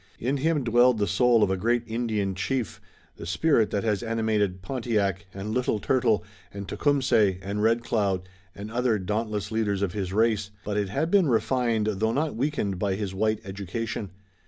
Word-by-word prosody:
In 130 +4 -1
him 150 0 +1
dwelled 120 +1 +4
the 105 - +1
soul 120 +3 +3
of - - +2
a 95 - 0
great 120 +4 +1
Indian 110 -4 -1
chief, 115 +5 -3 0.4
the 85 - -8
spirit 115 - +2
that 100 - -1
has 105 -3 0
animated 110 -5 0
Pontiac, 105 -7 -1
and 100 +3 -5
Little 125 -3 +1
Turtle, 115 -6 +2 0.3
and 100 -1 -7
Tecumseh 125 -7 +2
and 100 +2 -3
Red 115 +2 +2
Cloud 100 -6 0 0.3
and 105 +2 -7
other 120 -2 +1
dauntless 105 +1 -2
leaders 105 -3 0
of 95 -3 -1
his 95 -3 -3
race, 110 -1 +1 0.2
but 105 - -2
it 100 -2 0
had 155 - -1
been 195 -5 +5
refined 115 -2 +1
though 110 +1 0
not 150 -1 -1
weakened 115 -8 -1
by 100 -1 0
his 100 -1 -4
white 110 +2 0
education. 100 +2 -4
110 Hz, 180 wpm, -26 LUFS, 100-120 Hz, 0.4 s, been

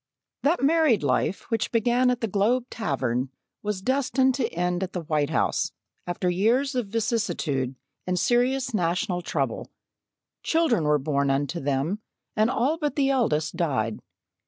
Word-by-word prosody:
That 300 +1 +1
married 305 - +4
life 140 +7 +1
which 225 -1 0
began 240 +2 +3
at 245 -1 0
the 225 - 0
Globe 225 +5 +1
Tavern 130 - -1 0.3
was 205 -2 -3
destined 265 0 +2
to 260 -2 -1
end 180 +1 -1
at 190 0 -3
the 180 - -3
White 150 -2 0
House, 160 - 0 0.3
after 175 +1 -2
years 230 +10 +2
of 250 -4 -1
vicissitude 195 - -1 0.3
and 180 0 0
serious 255 +4 +1
national 180 0 0
trouble. - - -2 0.7
Children 320 - +2
were 150 0 +4
born 140 0 0
unto 140 +5 0
them, 145 +8 -1 0.4
and 215 +2 +3
all 275 +7 +1
but 295 -2 -1
the 275 -2 +2
eldest 160 - +1
died. 125 - 0
205 Hz, 150 wpm, -25 LUFS, 155-250 Hz, 0.7 s, married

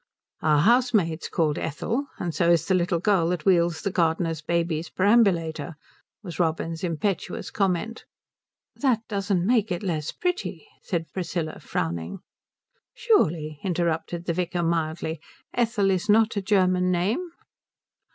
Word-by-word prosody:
"Our 150 -2 +3
housemaid's 215 -7 +2
called 155 -4 0
Ethel, 230 - -2
and 170 -2 -3
so 170 0 +2
is 170 -2 +4
the 190 - +1
little 175 -1 +2
girl 180 -2 +2
that 175 -3 -2
wheels 170 -3 +3
the 200 - -1
gardener's 165 -2 0
baby's 165 0 -1
perambulator," 175 -7 +2 0.5
was 175 -3 -8
Robin's 165 0 -1
impetuous 180 +3 -2
comment. 200 +3 -1 0.7
"That 255 -6 +1
doesn't 195 -3 0
make 220 -2 +2
it 175 +3 -2
less 160 -5 -2
pretty," 360 +4 -3
said 165 -4 -4
Priscilla, 170 -3 -3
frowning. 85 - -3 0.7
"Surely," 160 - +1
interrupted 170 -1 -1
the 170 - 0
vicar 175 0 -1
mildly, 160 -1 -1 0.3
"Ethel 225 -5 +1
is 190 +3 -1
not 220 +1 +4
a 200 - 0
German 185 -2 +2
name?" 215 - -1
175 Hz, 130 wpm, -25 LUFS, 165-200 Hz, 0.7 s, is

